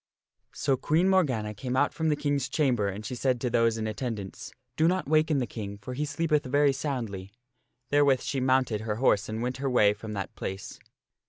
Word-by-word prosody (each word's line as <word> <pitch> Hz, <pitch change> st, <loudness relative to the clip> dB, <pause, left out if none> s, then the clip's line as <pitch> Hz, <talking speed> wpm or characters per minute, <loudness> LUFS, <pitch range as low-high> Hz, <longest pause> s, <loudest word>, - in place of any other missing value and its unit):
So 135 Hz, -, +1 dB
Queen 160 Hz, +8 st, +2 dB
Morgana 130 Hz, -, +2 dB
came 125 Hz, +4 st, -4 dB
out 145 Hz, -, +2 dB
from 160 Hz, -1 st, 0 dB
the 150 Hz, -, +2 dB
King's 145 Hz, -2 st, -1 dB
chamber 130 Hz, -8 st, +1 dB
and 100 Hz, +2 st, -5 dB
she -, -, -4 dB
said 125 Hz, 0 st, 0 dB
to 125 Hz, -, -1 dB
those 115 Hz, -1 st, +2 dB
in 110 Hz, -, -2 dB
attendance, 110 Hz, 0 st, -5 dB
" 125 Hz, 0 st, -51 dB
Do 160 Hz, -, +3 dB
not 185 Hz, +1 st, 0 dB
waken 155 Hz, 0 st, +3 dB
the 130 Hz, -, +1 dB
King, 100 Hz, -3 st, -6 dB
for 105 Hz, +5 st, -7 dB
he 145 Hz, +4 st, -2 dB
sleepeth 150 Hz, 0 st, 0 dB
very 145 Hz, +1 st, +3 dB
soundly." 120 Hz, -9 st, -4 dB, 0.6 s
Therewith 140 Hz, -2 st, +4 dB
she 135 Hz, -, -2 dB
mounted 130 Hz, -4 st, +2 dB
her 110 Hz, -1 st, -2 dB
horse 110 Hz, -3 st, +2 dB
and 110 Hz, +2 st, -3 dB
went 125 Hz, +1 st, -2 dB
her 135 Hz, 0 st, -1 dB
way 105 Hz, -5 st, +4 dB
from 105 Hz, +1 st, -8 dB
that 100 Hz, -1 st, -4 dB
place. 95 Hz, 0 st, -6 dB
125 Hz, 205 wpm, -28 LUFS, 110-145 Hz, 0.6 s, Therewith